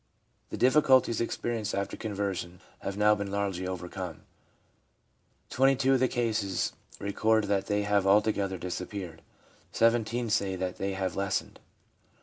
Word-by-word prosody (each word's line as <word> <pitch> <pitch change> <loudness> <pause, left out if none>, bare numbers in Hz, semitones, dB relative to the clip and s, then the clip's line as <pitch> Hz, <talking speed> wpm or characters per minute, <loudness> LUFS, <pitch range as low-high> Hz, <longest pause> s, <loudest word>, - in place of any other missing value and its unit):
The - - -5
difficulties 130 -3 +4
experienced 115 -2 -2
after 100 0 -2
conversion 100 -5 -4 0.2
have: 100 0 -5
now 105 0 +5
been 100 -1 -3
largely 100 -2 -2
overcome. 90 -2 -6 1.3
Twenty 135 +1 +4
two 135 +1 +2
of 130 - +3
the 130 - +3
cases 110 -6 -1 0.3
record 110 +2 +1
that 100 -1 0
they 105 -1 +1
have 100 -1 +2
altogether 100 -1 +2
disappeared; 90 0 -6 0.5
17 115 0 +2
say 100 -2 +1
that 90 0 -3
they 100 0 -1
have 95 -2 -2
lessened. 100 -1 -2
100 Hz, 135 wpm, -29 LUFS, 95-115 Hz, 1.3 s, now